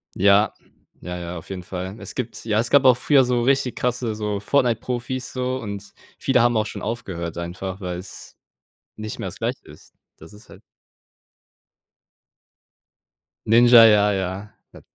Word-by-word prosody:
Ja. 100 Hz, +2 st, +4 dB, 0.5 s
Ja, 90 Hz, +1 st, -6 dB
ja, 85 Hz, 0 st, -6 dB
auf 80 Hz, -, -11 dB
jeden 95 Hz, -, -5 dB
Fall. 95 Hz, +2 st, -6 dB
Es -, -, -9 dB
gibt 125 Hz, -3 st, -5 dB
ja, 110 Hz, -2 st, 0 dB
es 115 Hz, -, -1 dB
gab 140 Hz, -1 st, +6 dB
auch 125 Hz, -2 st, +6 dB
früher 135 Hz, 0 st, +4 dB
so 120 Hz, -1 st, 0 dB
richtig 135 Hz, -1 st, +1 dB
krasse 125 Hz, -3 st, -2 dB
so 105 Hz, -2 st, -3 dB
Fortnite-Profis 125 Hz, +1 st, -1 dB
so 130 Hz, 0 st, -2 dB
und 100 Hz, -2 st, -7 dB, 0.2 s
viele 130 Hz, -2 st, +2 dB
haben 120 Hz, -1 st, +3 dB
auch 110 Hz, -, +1 dB
schon -, -, -7 dB
aufgehört 90 Hz, -8 st, -5 dB
einfach, 90 Hz, +3 st, -5 dB
weil's 90 Hz, 0 st, -8 dB, 0.6 s
nicht 110 Hz, 0 st, -6 dB
mehr -, -, -5 dB
das -, -, -11 dB
Gleiche -, -, -3 dB
ist. -, -, -16 dB, 0.2 s
Das 80 Hz, -, -14 dB
ist 105 Hz, +2 st, -16 dB
halt -, -, -15 dB, 2.8 s
Ninja, 120 Hz, +1 st, +7 dB
ja, 105 Hz, -1 st, +5 dB
ja, 95 Hz, +2 st, -4 dB, 0.2 s
da -, -, -14 dB
110 Hz, 155 wpm, -22 LUFS, 95-120 Hz, 2.8 s, Ninja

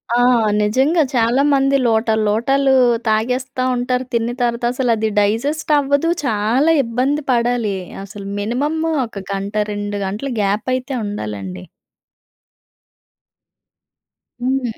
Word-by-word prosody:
ఆ! -, -, +3 dB, 0.4 s
నిజంగా 265 Hz, +11 st, +2 dB
చాలామంది 270 Hz, +3 st, +3 dB
లోటాలు 220 Hz, -1 st, +1 dB
లోటాలు 270 Hz, +6 st, +2 dB, 0.3 s
తాగేస్తా 250 Hz, +4 st, 0 dB
ఉంటారు 250 Hz, +1 st, -1 dB
తిన్న 235 Hz, +1 st, 0 dB
తర్వాత. 235 Hz, 0 st, 0 dB
అసలు 250 Hz, -2 st, 0 dB
అది 220 Hz, 0 st, -1 dB
డైజెస్ట్ 255 Hz, +10 st, 0 dB
అవ్వదు. 285 Hz, +3 st, +1 dB, 0.2 s
చాలా 235 Hz, +8 st, +2 dB
ఇబ్బంది 260 Hz, +6 st, -1 dB
పడాలి. 235 Hz, -4 st, 0 dB, 0.3 s
అసలు 200 Hz, 0 st, -9 dB
మినిమమ్ము 295 Hz, +10 st, -1 dB
ఒక 200 Hz, -4 st, -8 dB
గంట 200 Hz, +1 st, -4 dB, 0.2 s
2 205 Hz, 0 st, -4 dB
గంటలు 210 Hz, +8 st, -4 dB
గ్యాప్ 205 Hz, +3 st, -1 dB
అయితే 255 Hz, +2 st, -4 dB
ఉండాలండి. 100 Hz, -, -6 dB, 2.8 s
హ్మ్. 255 Hz, -2 st, -1 dB
240 Hz, 105 wpm, -18 LUFS, 210-270 Hz, 2.8 s, ఆ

